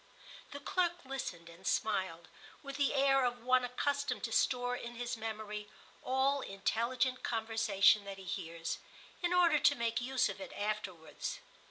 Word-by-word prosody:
The 285 - -7
clerk 345 +2 0
listened 220 -11 -5
and 170 +3 -10
smiled, 190 -6 0 0.4
with 275 0 -6
the 285 -1 +2
air 270 -1 +4
of 245 -1 -1
one 255 0 +4
accustomed 285 +3 -1
to - - -2
store 245 -1 +2
in 240 -1 -7
his 240 0 -3
memory 215 -2 -5 0.3
all 270 +2 +2
intelligent 240 +6 0
conversation 220 -3 +3
that 195 -1 -6
he 195 - -10
hears, 165 -2 -4 0.4
in 350 -1 +1
order 345 -4 +5
to - - +5
make 235 0 0
use 255 0 +2
of 195 - -6
it - - -7
afterwards. 205 -6 -3
240 Hz, 155 wpm, -34 LUFS, 205-270 Hz, 0.4 s, order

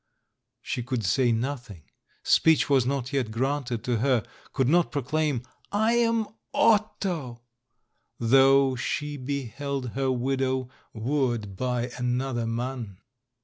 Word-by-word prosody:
She - - -3
could 120 -2 -2
say 125 +5 +3
nothing 115 - -3 0.3
— - - -38
speech 160 -2 +3
was 130 -3 +4
not 135 0 -2
yet 130 -5 0
granted 125 0 -2
to 125 -2 0
her 125 -2 +2 0.2
— - - -25
could 130 -3 +1
not 170 +4 +3
proclaim, 145 -1 -1 0.3
"I 220 +2 +2
am 230 -2 +2 0.3
Otto," 190 - +1 0.7
though 135 +2 +5
she 145 +4 -3
beheld 140 0 -4
her 135 +2 -1
widow 130 0 -1 0.3
wooed 120 -4 -1
by 125 +2 -2
another 125 -1 -1
man. 115 -3 -4
130 Hz, 125 wpm, -26 LUFS, 120-145 Hz, 0.7 s, though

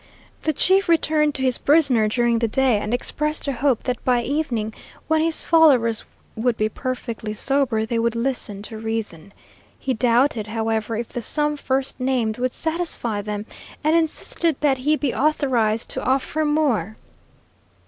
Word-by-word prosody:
The 315 - +1
chief 380 +5 +2
returned 310 -3 +2
to 265 - -2
his 255 -2 +1
prisoner 275 -8 +3
during 235 +1 +1
the 230 - +1
day, 250 -1 +2
and 210 - -4
expressed 300 +5 -2
a 280 - 0
hope 260 -1 +1
that 250 -2 -3
by 245 -2 +2
evening, 245 -6 -2 0.3
when 315 0 +2
his 325 0 0
followers 265 -9 +4 0.3
would 230 +1 0
be 215 0 +1
perfectly 230 -3 -4
sober, 250 -3 +1
they 230 +1 -1
would 230 0 0
listen 230 -5 -3
to 220 0 -8
reason. 220 -6 -4 0.5
He 265 - -2
doubted, 240 0 +2
however, 225 0 -2
if 230 +1 -4
the 240 - -5
sum 295 +5 -1
first 270 -1 -2
named 245 -4 0
would 255 0 -1
satisfy 320 -10 -1
them, 210 0 -5 0.4
and 310 +2 +3
insisted 330 0 +1
that 275 -3 +2
he 295 +4 +2
be 285 -4 -1
authorized 250 -7 +1
to - - -3
offer 275 +4 0
more. 250 - 0
255 Hz, 160 wpm, -22 LUFS, 225-295 Hz, 0.5 s, followers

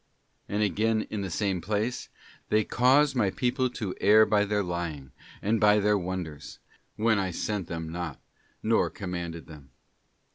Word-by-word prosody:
{ - - -41
And 105 +1 0
again 110 +2 +1
in 105 - -2
the 95 - -3
same 95 0 -1
place: 110 +6 -2 0.2
' - - -26
They 110 0 +3
cause 135 +6 +3
my 115 -7 +2
people 125 +4 0
to 105 -6 -4
err 110 +1 +7
by 105 -1 +2
their 105 0 0
lying, 85 -7 -4 0.3
and 110 +2 +1
by 105 0 +6
their 105 +1 +3
wonders; 90 -5 -5 0.4
when 110 -1 +2
I 95 -1 -1
sent 95 +1 -3
them 80 -1 -5
not, 85 -4 -5 0.4
nor 110 +1 +2
commanded 85 -4 -5
them. 75 -4 -13
100 Hz, 170 wpm, -28 LUFS, 85-110 Hz, 0.4 s, err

